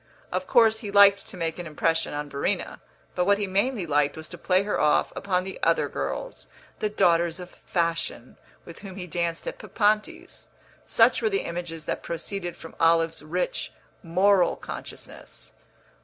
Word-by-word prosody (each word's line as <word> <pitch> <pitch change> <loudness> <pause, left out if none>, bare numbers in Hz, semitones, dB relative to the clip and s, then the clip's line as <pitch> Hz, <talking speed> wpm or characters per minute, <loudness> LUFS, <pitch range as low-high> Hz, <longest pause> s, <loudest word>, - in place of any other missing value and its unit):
Of - - -2
course 225 -3 +5
he 215 - -6
liked 200 0 +6
to - - -9
make 165 0 -3
an 175 - -5
impression 165 +2 0
on 145 0 -4
Verena; 140 0 -2 0.3
but 180 - 0
what 200 +1 +4
he 205 - -1
mainly 200 +2 0
liked 145 -1 +1
was 160 0 -7
to - - -9
play 185 +1 +2
her 205 - -1
off 150 - +2
upon 185 -2 0
the 190 0 -7
other - - +2
girls, - - -5 0.3
the 215 - 0
daughters 170 -4 +2
of 180 0 -9 0.2
fashion, 165 -7 -2 0.3
with 170 - -11
whom 195 -3 -9
he 185 -2 -6
danced 170 -1 -2
at - - -5
Papanti's. 225 - -1 0.4
Such - - +4
were 440 - +2
the 395 -1 -1
images 170 -2 -5
that - - -3
proceeded 175 +1 -5
from 165 - -11
Olive's 165 -1 +3
rich 170 +4 -3 0.3
moral 185 +2 +3
consciousness. - - -9
180 Hz, 170 wpm, -26 LUFS, 165-200 Hz, 0.4 s, liked